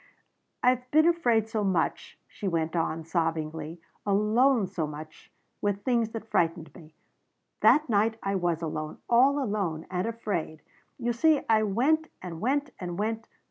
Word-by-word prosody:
"I've 250 0 +2
been 310 +3 +5
afraid 240 -11 +2
so 220 -2 -2
much," 185 -4 -1
she 205 - -6
went 165 -2 -1
on 165 -1 -1
sobbingly. 160 -1 -2 0.2
"Alone 215 +4 +3
so 165 -4 -3
much 155 +1 -10 0.3
with 205 0 -1
things 235 -2 +1
that 225 -1 -7
frightened 165 -2 0
me. 155 -3 -15 0.6
That 305 +1 +5
night 220 0 +2
I 195 - -1
was 175 -3 0
alone. 155 -1 -4
All 260 +4 +5
alone. 200 - -2
And 180 +3 -1
afraid. 195 -9 -4 0.3
You 240 -1 -1
see 310 +5 +3
I 220 -1 +4
went 265 +10 +1
and 170 -2 -7
went 280 +3 0
and 175 -2 -5
went. 225 +2 -2
205 Hz, 150 wpm, -28 LUFS, 165-240 Hz, 0.6 s, been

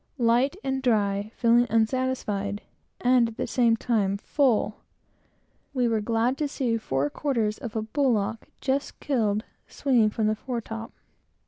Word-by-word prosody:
Light 245 +4 +3
and 265 0 -1
dry, 205 -4 +1
feeling 235 +1 +4
unsatisfied, 220 -3 0 0.4
and, 245 -1 +4
at 230 - -9
the - - -1
same 235 -2 +2
time, 205 -5 0
full, 225 -3 +1 1.0
we 250 -2 +2
were 225 -2 +1
glad 230 +4 0
to 300 - +1
see 255 -4 -1
four 135 -8 -1
quarters 230 -7 -1
of 230 -5 -7
a 220 - -1
bullock, 225 -3 0
just 275 +1 -1
killed, 220 -7 0 0.2
swinging 245 -6 +2
from 215 +1 -1
the 215 - +3
fore 240 +2 -4
top. 225 +1 -7
230 Hz, 145 wpm, -26 LUFS, 215-255 Hz, 1.0 s, feeling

